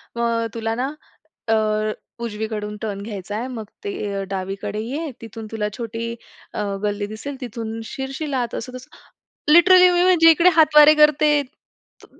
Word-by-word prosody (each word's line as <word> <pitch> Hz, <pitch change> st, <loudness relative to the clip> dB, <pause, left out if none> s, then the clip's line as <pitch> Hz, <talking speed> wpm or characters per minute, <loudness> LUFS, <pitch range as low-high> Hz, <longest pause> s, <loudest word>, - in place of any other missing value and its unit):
मग 235 Hz, -, -2 dB, 0.2 s
अ, -, -, -2 dB
तुला 225 Hz, 0 st, -2 dB
ना 265 Hz, +4 st, -2 dB, 0.6 s
अ, 225 Hz, -, +4 dB, 0.7 s
उजवीकडून 210 Hz, -1 st, -4 dB
टर्न 200 Hz, -2 st, -4 dB
घ्यायचाय 210 Hz, +2 st, -5 dB
मग 230 Hz, -4 st, -6 dB, 0.2 s
ते 405 Hz, -, -3 dB, 0.2 s
अ, 195 Hz, -, -2 dB
डावीकडे 195 Hz, +2 st, -4 dB
ये, 285 Hz, +7 st, -4 dB
तिथून 225 Hz, -1 st, -9 dB
तुला 210 Hz, -2 st, -2 dB
छोटी 230 Hz, 0 st, -4 dB, 0.4 s
अ, 210 Hz, -, -2 dB, 0.2 s
गल्ली 205 Hz, 0 st, -1 dB
दिसेल 225 Hz, +7 st, -7 dB
तिथून 225 Hz, -1 st, -5 dB
शिरशिल 270 Hz, +4 st, -5 dB
आत." 245 Hz, -3 st, -2 dB
असं-तसं, 255 Hz, +1 st, -8 dB, 0.6 s
लिटरली 365 Hz, +2 st, +7 dB
मी 350 Hz, 0 st, +3 dB
म्हणजे 350 Hz, -3 st, +6 dB
इकडे 340 Hz, +3 st, +5 dB
हातवारे 305 Hz, -2 st, +7 dB
करते, 300 Hz, 0 st, +4 dB, 0.6 s
त -, -, -13 dB
235 Hz, 150 wpm, -21 LUFS, 215-300 Hz, 0.7 s, लिटरली